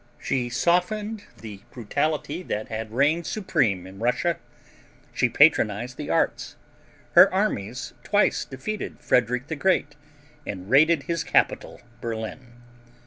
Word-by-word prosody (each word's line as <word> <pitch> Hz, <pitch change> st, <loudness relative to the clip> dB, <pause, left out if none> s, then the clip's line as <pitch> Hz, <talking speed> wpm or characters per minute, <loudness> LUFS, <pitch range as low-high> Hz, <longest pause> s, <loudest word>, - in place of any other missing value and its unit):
She 125 Hz, -2 st, -1 dB
softened 205 Hz, -, 0 dB
the 105 Hz, -3 st, -10 dB
brutality 145 Hz, -, -2 dB
that 110 Hz, -11 st, -4 dB
had 110 Hz, 0 st, -5 dB
reigned 150 Hz, +7 st, +1 dB
supreme 110 Hz, -, 0 dB
in 95 Hz, +1 st, -12 dB
Russia. 125 Hz, +8 st, 0 dB, 0.8 s
She 125 Hz, -, +2 dB
patronized 120 Hz, -4 st, +3 dB
the -, -, -6 dB
arts. -, -, 0 dB, 0.6 s
Her -, -, +8 dB
armies 125 Hz, -, -2 dB
twice -, -, +2 dB
defeated 170 Hz, +12 st, -6 dB
Frederick 125 Hz, +1 st, +1 dB
the 160 Hz, -, -4 dB
Great 145 Hz, -3 st, +1 dB, 0.5 s
and 95 Hz, -7 st, -6 dB
raided 150 Hz, +2 st, +5 dB
his 170 Hz, +2 st, -2 dB
capital, -, -, 0 dB, 0.2 s
Berlin. 120 Hz, +2 st, -6 dB
130 Hz, 120 wpm, -25 LUFS, 115-170 Hz, 0.8 s, Her